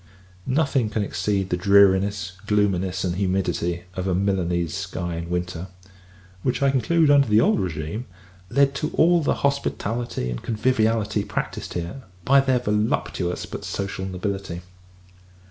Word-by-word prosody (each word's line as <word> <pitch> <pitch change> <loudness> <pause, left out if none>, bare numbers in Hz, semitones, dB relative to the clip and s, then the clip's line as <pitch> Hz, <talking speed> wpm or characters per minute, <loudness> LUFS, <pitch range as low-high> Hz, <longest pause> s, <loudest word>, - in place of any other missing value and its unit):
Nothing 135 -4 +1
can 105 0 -1
exceed 95 0 -1
the - - +3
dreariness, 100 0 +4 0.2
gloominess, 95 -3 +1
and 90 -1 -1
humidity, 90 -2 -1
of 95 +1 -3
a 95 - +1
Milanese 90 -3 0
sky 90 -3 -4
in 85 0 -5
winter; 90 0 -3 0.7
which, 130 +7 0
I 140 - +4
conclude, 145 +4 +3
under 140 -2 +5
the 105 0 +4
old - - +3
regime, 90 +5 -4 0.4
led 140 +3 +3
to 150 +2 -2
all 170 +1 +4
the 150 - +1
hospitality, 120 - -1
and - - -5
conviviality, 110 -2 +1
practised - - -4
here, 85 +9 -4 0.2
by 140 +1 +6
their 135 -2 +2
voluptuous 105 -5 -1
but - - -7
social 100 -1 -4
nobility. 95 -1 -4
100 Hz, 140 wpm, -23 LUFS, 90-120 Hz, 0.7 s, by